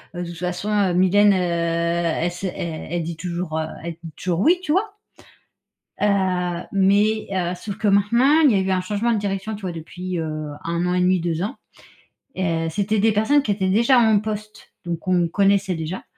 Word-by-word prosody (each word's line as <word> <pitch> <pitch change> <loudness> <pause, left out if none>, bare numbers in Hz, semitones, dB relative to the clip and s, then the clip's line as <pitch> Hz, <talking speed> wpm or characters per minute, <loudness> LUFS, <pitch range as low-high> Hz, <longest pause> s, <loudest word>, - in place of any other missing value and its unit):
heu, 175 - -3
toute 170 -1 -7
façon, 180 +3 -3
heu, 200 -4 +2
Mylène, 200 +3 +4
heu, - - +1
elle 170 -1 0
sait 180 +1 -5
elle 165 -2 -5
elle 175 -1 -1
dit 165 0 -5
toujours, 170 -2 -3
heu, 160 - -1 0.2
elle 170 -1 -5
dit 165 -1 -9
toujours 175 -2 -2
"oui"», 345 - +4
tu 300 - -2
vois. 400 +5 0 1.1
Heu, 210 - +4 0.7
mais, 205 +2 +2
heu, 180 -2 -1
sauf 195 +3 -7
que, - - -2
maintenant, 235 +10 +4
il 290 - +7
y - - +2
a - - +2
eu 190 0 -1
un 185 - +1
changement 210 +5 -1
de 220 - +1
direction, 200 +1 -3
tu 205 - -9
vois, 185 - -3
depuis, 175 +2 -6
heu, 155 -1 -4 0.2
1 170 +1 -1
an 180 - 0
et 180 - +1
demi, 180 0 +3
2 165 0 -2
ans, 215 - -4 0.8
heu, 165 -3 0
c'était 205 +5 0
des 220 +2 +3
personnes 270 +8 +3
qui 210 - -1
étaient 190 -2 0
déjà 235 +6 +4
en 220 -3 +4
poste. 215 0 -7
Donc 170 -2 -3
qu'on 180 -1 +1
connaissait 195 +1 +2
déjà 160 +3 -5
185 Hz, 210 wpm, -22 LUFS, 170-210 Hz, 1.1 s, il